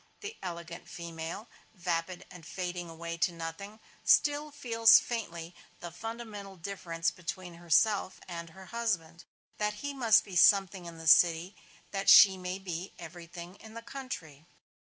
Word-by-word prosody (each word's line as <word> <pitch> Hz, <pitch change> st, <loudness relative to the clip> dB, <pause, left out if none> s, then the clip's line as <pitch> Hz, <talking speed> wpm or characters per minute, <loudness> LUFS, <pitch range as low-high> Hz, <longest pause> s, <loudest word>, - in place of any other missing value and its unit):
The 420 Hz, +1 st, -6 dB
elegant 170 Hz, -2 st, -7 dB
female, 170 Hz, +4 st, -6 dB, 0.3 s
vapid 175 Hz, -1 st, -3 dB
and 180 Hz, -2 st, -12 dB
fading 175 Hz, +1 st, -5 dB
away 170 Hz, +1 st, -6 dB
to 170 Hz, -, +1 dB
nothing, 170 Hz, +6 st, -7 dB, 0.2 s
still 295 Hz, +1 st, +3 dB
feels 230 Hz, -6 st, +5 dB
faintly 170 Hz, -8 st, -4 dB, 0.3 s
the 175 Hz, -, -7 dB
fundamental 210 Hz, 0 st, -7 dB
difference 170 Hz, -2 st, -3 dB
between 175 Hz, 0 st, -7 dB
herself 185 Hz, +4 st, +1 dB
and 170 Hz, -2 st, -6 dB
her 190 Hz, +3 st, -13 dB
husband: 180 Hz, -8 st, -2 dB, 0.3 s
that 210 Hz, 0 st, 0 dB
he 285 Hz, -, -2 dB
must 235 Hz, -5 st, +4 dB
be 195 Hz, -, -10 dB
Something 190 Hz, 0 st, +4 dB
in 170 Hz, -1 st, -9 dB
the 165 Hz, -, -10 dB
City, 170 Hz, +4 st, +5 dB, 0.4 s
that 195 Hz, -1 st, 0 dB
she 195 Hz, -2 st, +9 dB
may 180 Hz, 0 st, -4 dB
be 185 Hz, -1 st, -6 dB
everything 170 Hz, +2 st, -10 dB
in 220 Hz, +1 st, -13 dB
the 230 Hz, -, -8 dB
country. 180 Hz, -, -8 dB
180 Hz, 145 wpm, -30 LUFS, 170-210 Hz, 0.4 s, she